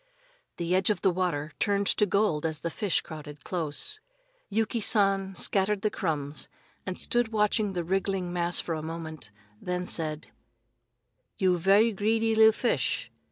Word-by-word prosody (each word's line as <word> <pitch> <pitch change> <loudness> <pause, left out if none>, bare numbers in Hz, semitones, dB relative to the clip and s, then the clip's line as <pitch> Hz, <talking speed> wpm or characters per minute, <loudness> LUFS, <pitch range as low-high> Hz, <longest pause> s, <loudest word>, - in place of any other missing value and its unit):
The 170 +1 -1
edge 190 +2 +3
of 210 -3 0
the 190 - +4
water 170 -5 -1
turned 200 0 +1
to 210 - +2
gold 200 -6 +1
as 160 -2 -2
the 170 - -3
fish 200 +1 0
crowded 150 -3 -10
close. 180 - -2 0.5
Yuki 220 +3 0
San 195 -3 +2
scattered 195 +1 +2
the 215 - +1
crumbs 150 -4 -2 0.4
and 185 - -3
stood 240 -1 +1
watching 210 -2 +1
the 175 -2 -2
wriggling 190 0 -1
mass 175 0 +1
for 165 - -2
a 155 - -3
moment, 160 -6 -7 0.3
then 180 0 -2
said: 155 -3 -3 1.1
"You 185 -2 +2
ve'y 200 +6 +5
greedy 225 +2 +1
li'l 220 0 +7
fish. 240 +3 -1
185 Hz, 155 wpm, -28 LUFS, 165-210 Hz, 1.1 s, li'l